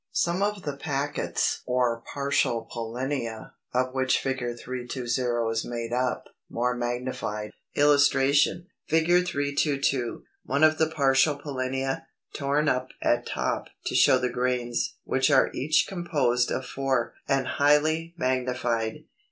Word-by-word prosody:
Some 175 +2 +1
of 205 -1 -1
the 145 -2 -3
packets 140 0 -1
or 125 -2 +1
partial 140 -5 0
pollinia, 120 0 -4 0.2
of 130 +1 0
which 130 -1 +2
Fig. 135 0 -2 0.2
320 125 +1 -6 0.5
is 115 0 -1
made 120 -1 -4
up, 125 0 0 0.3
more 125 +1 0
magnified.] 120 -3 -3 0.2
[Illustration: 145 +3 +4 0.2
Fig. 160 0 +2 0.2
322. 140 -4 0 0.2
One 140 +4 0
of 155 0 +5
the 160 - +4
partial 140 -1 +3
pollinia, 135 -1 -3 0.3
torn 145 +1 0
up 130 -2 +1 0.2
at 120 0 +1
top - - -2 0.2
to - - -2
show 130 - +6
the 125 0 -1
grains 125 -1 -1
(which 130 +2 +1
are 135 -2 +4
each 155 +4 +2
composed 145 -10 0
of 130 - -2
four), 130 -3 -1
and 135 -1 +1
highly 155 +3 +2
magnified. 125 -1 -1
130 Hz, 125 wpm, -26 LUFS, 125-145 Hz, 0.5 s, show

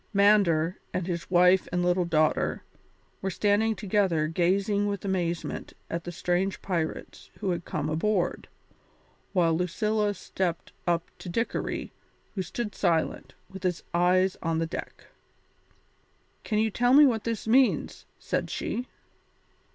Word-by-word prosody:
Mander, 195 -4 +4 0.2
with 185 - -1
his 170 -2 -4
wife 180 +1 +5
and 175 0 0
little 180 0 +2
daughter, 155 -2 +1 0.6
were 190 - -1
standing 210 +4 +2
together 190 -7 +1
gazing 195 +5 +1
with 200 -1 -3
amazement 175 -3 -2 0.2
at 170 0 -3
the 175 - -4
strange 180 +3 -1
pirates 170 -5 -3
who 190 - -1
had 175 -1 -3
come 150 0 -2
aboard, 175 +4 0 0.8
while 170 -4 +3
Lucilla 205 +4 0
stepped 175 -4 -3 0.2
up 170 -1 0
to 180 - -7
Dickory, 230 +7 -2 0.4
who 195 - -2
stood 210 +4 -4
silent, 170 -4 0
with 190 0 -10
his 180 -2 -1
eyes 180 +2 +3
on 165 -1 0
the 165 - 0
deck. 160 - -7 1.4
"Can 215 - -1
you 220 0 +2
tell 245 +4 +2
me 295 +1 +9
what 225 -6 +1
this 230 -2 -3
means?" 255 +3 +2
said - - -2
she. 250 +1 -3
185 Hz, 135 wpm, -27 LUFS, 170-205 Hz, 1.4 s, me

